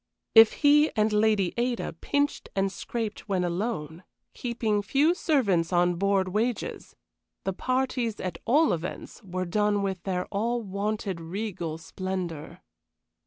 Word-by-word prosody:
If 225 Hz, -1 st, +8 dB
he 295 Hz, +1 st, +6 dB
and 215 Hz, 0 st, +2 dB
Lady 210 Hz, -3 st, +2 dB
Ada 240 Hz, -4 st, -1 dB
pinched 285 Hz, -, -1 dB
and 195 Hz, 0 st, +1 dB
scraped 220 Hz, +1 st, -5 dB
when 185 Hz, -2 st, +1 dB
alone, 175 Hz, -3 st, -3 dB, 0.3 s
keeping 230 Hz, -4 st, -1 dB
few 280 Hz, -, +3 dB
servants 220 Hz, -, +1 dB
on 175 Hz, 0 st, +3 dB
board 195 Hz, +1 st, +1 dB
wages, 220 Hz, +5 st, -2 dB, 0.5 s
the 195 Hz, -, -1 dB
parties, 255 Hz, 0 st, -1 dB
at 180 Hz, -3 st, -4 dB
all 295 Hz, +7 st, +4 dB
events, 175 Hz, +7 st, -6 dB
were 185 Hz, -2 st, -4 dB
done 205 Hz, +2 st, +1 dB
with 190 Hz, -2 st, -2 dB, 0.3 s
all 230 Hz, +4 st, 0 dB
their 230 Hz, -, -8 dB
wonted 200 Hz, -3 st, -2 dB
regal 170 Hz, -2 st, -4 dB
splendor. 175 Hz, -2 st, -5 dB
205 Hz, 130 wpm, -27 LUFS, 185-235 Hz, 0.5 s, If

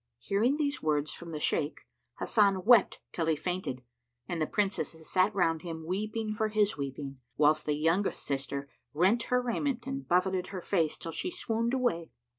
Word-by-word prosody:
Hearing 205 Hz, -, +1 dB
these 290 Hz, -2 st, -1 dB
words 150 Hz, -1 st, 0 dB
from 170 Hz, -1 st, -8 dB
the 155 Hz, -, -4 dB
Shaykh, 150 Hz, 0 st, 0 dB, 0.4 s
Hasan 200 Hz, -4 st, +2 dB
wept 235 Hz, -4 st, +6 dB
till 165 Hz, -2 st, -2 dB
he 160 Hz, -, +3 dB
fainted, 175 Hz, -6 st, -3 dB, 0.4 s
and 170 Hz, -3 st, -3 dB
the 155 Hz, -, +1 dB
Princesses 190 Hz, -6 st, -1 dB
sat 185 Hz, +2 st, +4 dB
round 165 Hz, -4 st, +2 dB
him, 160 Hz, -2 st, -6 dB
weeping 215 Hz, +4 st, -2 dB
for 220 Hz, 0 st, 0 dB
his 210 Hz, -1 st, +2 dB
weeping, 140 Hz, -1 st, -5 dB, 0.2 s
whilst 155 Hz, +1 st, +3 dB
the 150 Hz, -, +2 dB
youngest 165 Hz, +6 st, +1 dB
sister 140 Hz, 0 st, -3 dB, 0.3 s
rent 190 Hz, +9 st, +4 dB
her 250 Hz, 0 st, +2 dB
raiment 245 Hz, 0 st, -1 dB
and 270 Hz, 0 st, -4 dB
buffeted 180 Hz, +1 st, +2 dB
her 190 Hz, -2 st, -6 dB
face, 165 Hz, -6 st, +1 dB
till 165 Hz, -, -6 dB
she 360 Hz, -, -2 dB
swooned 230 Hz, -6 st, -1 dB
away. 230 Hz, -11 st, 0 dB
185 Hz, 175 wpm, -30 LUFS, 155-220 Hz, 0.4 s, wept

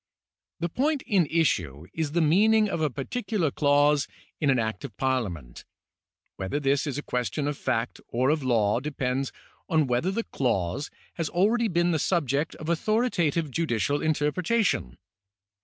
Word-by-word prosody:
The 170 Hz, +1 st, -1 dB
point 285 Hz, -, 0 dB
in 185 Hz, -6 st, +2 dB
issue 90 Hz, -, 0 dB
is 155 Hz, -2 st, -2 dB
the 170 Hz, -1 st, +3 dB
meaning 210 Hz, +7 st, +4 dB
of 170 Hz, -, -2 dB
a 155 Hz, -, +2 dB
particular 170 Hz, -, -2 dB
clause 145 Hz, 0 st, +3 dB, 0.3 s
in 150 Hz, -, +1 dB
an 130 Hz, -, +4 dB
Act 110 Hz, +3 st, -2 dB
of 120 Hz, -8 st, -8 dB
Parliament. 100 Hz, -, -2 dB, 0.7 s
Whether 95 Hz, +10 st, -2 dB
this 140 Hz, 0 st, +1 dB
is 140 Hz, -, -3 dB
a 145 Hz, -, -4 dB
question 125 Hz, +4 st, -2 dB
of 145 Hz, -, -1 dB
fact 120 Hz, -3 st, -2 dB
or 130 Hz, +4 st, +1 dB
of 155 Hz, -1 st, 0 dB
law, 115 Hz, -4 st, +2 dB
dejDends 135 Hz, -1 st, -2 dB, 0.4 s
on 155 Hz, -2 st, +3 dB
whether 125 Hz, +8 st, 0 dB
the 230 Hz, +4 st, -1 dB
clause 105 Hz, -, -1 dB, 0.3 s
has 165 Hz, -3 st, -1 dB
already 220 Hz, +6 st, +2 dB
been 175 Hz, -2 st, +1 dB
the 160 Hz, -, +1 dB
subject 150 Hz, -2 st, 0 dB
of 155 Hz, -, -8 dB
authoritative 170 Hz, -, +1 dB
judicial 145 Hz, -2 st, 0 dB
interjiretation. 155 Hz, -, 0 dB
150 Hz, 155 wpm, -26 LUFS, 125-170 Hz, 0.7 s, meaning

